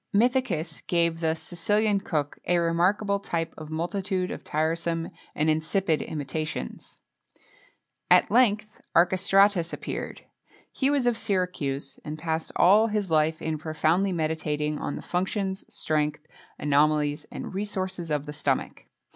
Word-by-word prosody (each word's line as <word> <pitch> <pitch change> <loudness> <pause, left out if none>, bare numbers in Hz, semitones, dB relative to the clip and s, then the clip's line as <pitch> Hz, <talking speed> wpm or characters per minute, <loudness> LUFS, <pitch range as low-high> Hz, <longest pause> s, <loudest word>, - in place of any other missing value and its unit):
Mithœcus 205 - +1
gave 170 -1 +1
the 160 -1 +1
"Sicilian 205 +5 +1
Cook" 150 -6 -2
a 175 - +3
remarkable 180 +5 +2
type 165 -4 -3
of 155 - -9
a - - -12
multitude 185 +3 -2
of - - -6
tiresome 165 +2 -1 0.2
and 155 - +1
insipid 160 +2 +1
imitations.[XXII 155 - -5 1.1
15] - - +9
At - - -16
length 215 -3 +2
Archestratus 185 0 +4
appeared. - - -5 0.5
He 270 - +1
was 285 -3 +1
of 240 -2 +2
Syracuse, 180 -10 -2
and 150 +1 -5
passed 160 0 -2
all 205 +5 +6
his 210 -5 -2
life 155 0 +2
in 160 -1 -2
profoundly 160 +5 +1
meditating 155 -2 -1
on - - -3
the - - -7
functions, 190 +1 -2
strength, 150 0 -1 0.3
anomalies, 150 0 +2
and - - -6
resources 185 -3 -3
of 150 -1 -1
the 150 - -6
stomach. 145 -3 -2
170 Hz, 135 wpm, -26 LUFS, 155-195 Hz, 1.1 s, 15